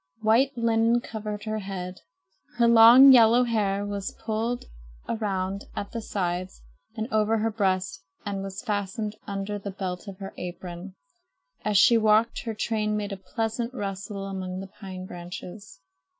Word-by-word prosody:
White 250 Hz, +5 st, +3 dB
linen 230 Hz, 0 st, +3 dB
covered 210 Hz, -3 st, -6 dB
her 215 Hz, 0 st, -2 dB
head. 190 Hz, -2 st, -6 dB, 0.6 s
Her 235 Hz, -1 st, +4 dB
long 235 Hz, +4 st, +9 dB
yellow 240 Hz, 0 st, +7 dB
hair 205 Hz, -4 st, 0 dB
was 200 Hz, -1 st, -5 dB
pulled 230 Hz, +2 st, -2 dB, 0.4 s
around 195 Hz, -3 st, -2 dB
at 200 Hz, -, -5 dB
the 230 Hz, -, -4 dB
sides 180 Hz, -, -3 dB, 0.3 s
and 220 Hz, -1 st, -3 dB
over 215 Hz, +1 st, +2 dB
her 225 Hz, +1 st, 0 dB
breast 190 Hz, -3 st, -1 dB, 0.2 s
and 200 Hz, -1 st, -3 dB
was 195 Hz, +3 st, -6 dB
fastened 210 Hz, -1 st, -2 dB
under 200 Hz, 0 st, -3 dB
the 200 Hz, -, -6 dB
belt 185 Hz, 0 st, -5 dB
of 195 Hz, -2 st, -8 dB
her 195 Hz, -1 st, -8 dB
apron. 180 Hz, +1 st, -7 dB, 0.7 s
As 210 Hz, -1 st, +2 dB
she 230 Hz, +5 st, +6 dB
walked, 220 Hz, +2 st, +2 dB
her 225 Hz, -2 st, -3 dB
train 215 Hz, -1 st, -1 dB
made 205 Hz, -1 st, -3 dB
a -, -, -3 dB
pleasant 225 Hz, +5 st, -3 dB
rustle 200 Hz, -1 st, -5 dB
among 185 Hz, -1 st, -5 dB
the 195 Hz, 0 st, -8 dB
pine 185 Hz, -2 st, -7 dB
branches. 180 Hz, -2 st, -9 dB
205 Hz, 150 wpm, -26 LUFS, 190-225 Hz, 0.7 s, long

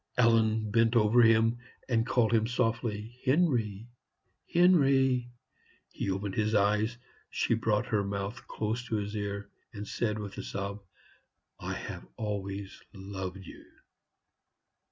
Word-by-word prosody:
Ellen 110 Hz, -2 st, +3 dB
bent, 115 Hz, +1 st, +3 dB
over 115 Hz, +1 st, +5 dB
him, 115 Hz, +1 st, +4 dB, 0.3 s
and 115 Hz, -2 st, +1 dB
called 120 Hz, -4 st, +2 dB
him 110 Hz, -1 st, +3 dB
softly, 115 Hz, -1 st, -2 dB
"Henry, 125 Hz, -, +1 dB, 0.7 s
Henry!" 135 Hz, -8 st, +4 dB, 0.6 s
He -, -, -3 dB
opened 95 Hz, +1 st, -2 dB
his 110 Hz, +1 st, 0 dB
eyes. 105 Hz, +3 st, +2 dB, 0.3 s
She -, -, 0 dB
brought 115 Hz, 0 st, +1 dB
her 105 Hz, -4 st, 0 dB
mouth 100 Hz, +3 st, -4 dB
close 110 Hz, +3 st, -2 dB
to 110 Hz, -, -1 dB
his 105 Hz, 0 st, -3 dB
ear, 100 Hz, -1 st, -4 dB, 0.2 s
and 105 Hz, -1 st, -6 dB
said, 110 Hz, -1 st, -1 dB
with 105 Hz, -2 st, -6 dB
a -, -, -4 dB
sob, 100 Hz, +1 st, -4 dB, 0.8 s
"I -, -, -4 dB
have -, -, -7 dB
always 100 Hz, -2 st, -4 dB
loved 95 Hz, -1 st, -6 dB
you." -, -, -11 dB
110 Hz, 130 wpm, -30 LUFS, 100-120 Hz, 0.8 s, over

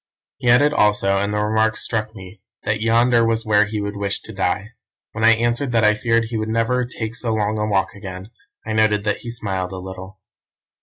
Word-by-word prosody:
He 125 Hz, -3 st, -1 dB
added 145 Hz, +5 st, +5 dB
also, 105 Hz, -4 st, +2 dB
and 100 Hz, +1 st, -1 dB
the 105 Hz, -, -1 dB
remark 110 Hz, +1 st, +1 dB
struck 110 Hz, -1 st, -3 dB
me, 95 Hz, +1 st, -12 dB, 0.2 s
that 105 Hz, 0 st, -1 dB
yonder 115 Hz, +1 st, +3 dB
was 115 Hz, 0 st, 0 dB
where 105 Hz, -1 st, +4 dB
he 105 Hz, 0 st, -4 dB
would 100 Hz, 0 st, -4 dB
wish 100 Hz, -1 st, -2 dB
to 110 Hz, -, -10 dB
die. 95 Hz, +2 st, -1 dB, 0.4 s
When 110 Hz, -, -4 dB
I 115 Hz, 0 st, +7 dB
answered 120 Hz, +3 st, -1 dB
that 115 Hz, -1 st, +3 dB
I 105 Hz, 0 st, +5 dB
feared 115 Hz, +1 st, +1 dB
he 115 Hz, 0 st, -4 dB
would 110 Hz, 0 st, -3 dB
never 115 Hz, +3 st, +1 dB
take 115 Hz, -2 st, -5 dB
so 115 Hz, -2 st, -1 dB
long 105 Hz, 0 st, -1 dB
a 105 Hz, -, 0 dB
walk 100 Hz, -2 st, 0 dB
again, 95 Hz, 0 st, -9 dB, 0.3 s
I 110 Hz, -, -3 dB
noted 105 Hz, -1 st, +2 dB
that 105 Hz, -1 st, 0 dB
he 120 Hz, -, -9 dB
smiled 95 Hz, -6 st, -3 dB
a 95 Hz, -, -6 dB
little. 95 Hz, +1 st, -9 dB
110 Hz, 215 wpm, -21 LUFS, 100-115 Hz, 0.4 s, I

